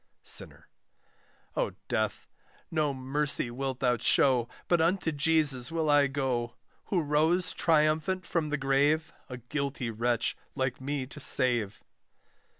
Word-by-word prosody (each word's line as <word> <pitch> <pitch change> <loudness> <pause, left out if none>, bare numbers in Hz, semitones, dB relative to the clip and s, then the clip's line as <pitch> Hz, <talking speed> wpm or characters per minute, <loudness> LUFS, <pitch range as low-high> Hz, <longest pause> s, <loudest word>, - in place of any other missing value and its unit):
SINNER. - - -4 0.9
O - - -1
Death! - - -2 0.4
no 155 -3 +1
mercy 135 -1 0
wilt 130 +1 -4
thou 125 -2 +2
show, 125 0 +3 0.2
But 175 -2 +2
unto 170 0 +1
Jesus 145 -4 +2
will 160 -2 0
I 145 -1 +5
go, 130 -3 -2 0.3
Who 180 -5 0
rose 160 +5 +1
triumphant 160 +3 +1
from 165 -3 -1
the 150 - -1
grave, 145 +3 +1 0.2
A 125 - -6
guilty 130 0 -4
wretch 115 +1 0 0.2
like 130 -1 -2
me 140 0 -3
to 145 +3 -11
save. 115 -7 +3
140 Hz, 130 wpm, -29 LUFS, 125-155 Hz, 0.9 s, I